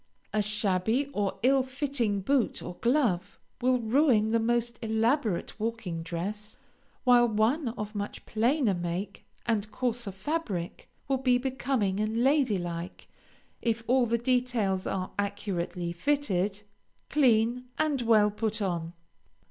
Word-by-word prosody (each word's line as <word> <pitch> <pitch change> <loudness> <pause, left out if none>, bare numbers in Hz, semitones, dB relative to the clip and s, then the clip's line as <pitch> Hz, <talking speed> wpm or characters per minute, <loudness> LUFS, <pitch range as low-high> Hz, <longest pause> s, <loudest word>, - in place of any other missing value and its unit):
A 215 - +2
shabby 210 +4 +1
or 205 -4 -1
ill 270 +1 +5
fitting 255 -6 -1
boot 265 +3 +1
or 180 - -6
glove 230 -8 +1 0.2
will 255 +1 +3
ruin 230 -2 +3
the 230 - +3
most 235 0 0
elaborate 225 - 0
walking 215 -7 -3
dress, 205 +6 -5 0.5
while 245 -1 +6
one 235 +7 +1
of 210 0 -5
much 205 -1 -5
plainer 235 +1 +2
make 175 +2 -4 0.2
and 215 -2 0
coarser 240 -4 -2
fabric 195 - -4 0.2
will 270 -1 +1
be 250 -1 +3
becoming 250 -6 -1
and 220 +2 0
lady 270 -6 +3
like, 175 0 -6 0.5
if 230 -1 0
all 250 0 +3
the 235 +1 +1
details 235 -6 0
are 185 -1 -2
accurately 190 -4 -2
fitted, 205 -3 0 0.5
clean, 245 -3 +3
and 300 -4 +1
well 215 -3 +4
put 220 +1 -2
on. 170 -4 -2
220 Hz, 130 wpm, -28 LUFS, 200-250 Hz, 0.5 s, while